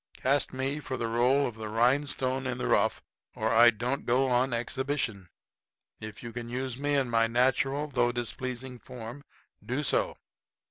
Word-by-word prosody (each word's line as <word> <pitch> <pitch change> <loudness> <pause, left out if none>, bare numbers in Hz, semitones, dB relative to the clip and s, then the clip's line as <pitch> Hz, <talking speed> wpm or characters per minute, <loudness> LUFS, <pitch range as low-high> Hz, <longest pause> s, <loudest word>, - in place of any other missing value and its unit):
Cast 140 +2 +1
me 135 +3 -2
for 130 -2 -4
the 115 - -2
role 125 +5 +3
of 120 - -3
the 110 -1 -7
rhinestone 130 +2 +1
in 125 -1 -2
the 125 - -3
rough 110 +2 +2 0.3
or 110 0 0
I 120 +1 +7
don't 120 +4 -2
go 130 +2 +2
on 125 +2 +2
exhibition. 120 -5 -2 0.7
If 110 +1 -9
you 120 -1 -7
can 120 0 -6
use 130 0 -3
me 145 +2 0
in 135 -2 +2
my 115 -1 +3
natural, 135 +4 +1
though 120 -4 +1
displeasing 125 +1 -5
form, 125 +2 -9 0.4
do 130 +5 -2
so." - - +1
125 Hz, 170 wpm, -29 LUFS, 120-135 Hz, 0.7 s, I